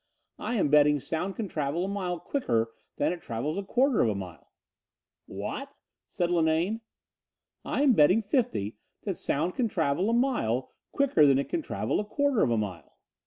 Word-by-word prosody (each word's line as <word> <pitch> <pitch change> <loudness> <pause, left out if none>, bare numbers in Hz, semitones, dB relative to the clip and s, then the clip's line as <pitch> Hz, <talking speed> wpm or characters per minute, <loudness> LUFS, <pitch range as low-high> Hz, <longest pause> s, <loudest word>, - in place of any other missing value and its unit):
I 245 - -2
am 190 -9 +2
betting 150 0 +5
sound 175 +7 -3
can 220 - -3
travel 155 +1 -2
a - - -3
mile 185 -3 -3
quicker 115 - -1 0.3
than - - +1
it 175 - -8
travels 125 +7 -3
a - - -4
quarter 255 +6 +2
of 115 - +3
a 105 - -1
mile." 90 -4 -9 0.8
"What?" - - -6 0.3
said 175 -1 -1
Linane. 170 +6 +1 0.8
"I'm 280 -2 +3
betting 185 +5 +5
fifty 200 - -1 0.3
that - - -2
sound 165 +6 -1
can 245 - 0
travel 175 0 0
a - - +1
mile 235 - 0 0.2
quicker 255 - +4
than 135 -1 +5
it 140 - -2
can 340 - -1
travel - - -2
a - - 0
quarter 285 +1 +1
of - - +3
a 115 - +1
mile." 100 -5 -5
170 Hz, 175 wpm, -28 LUFS, 140-225 Hz, 0.8 s, betting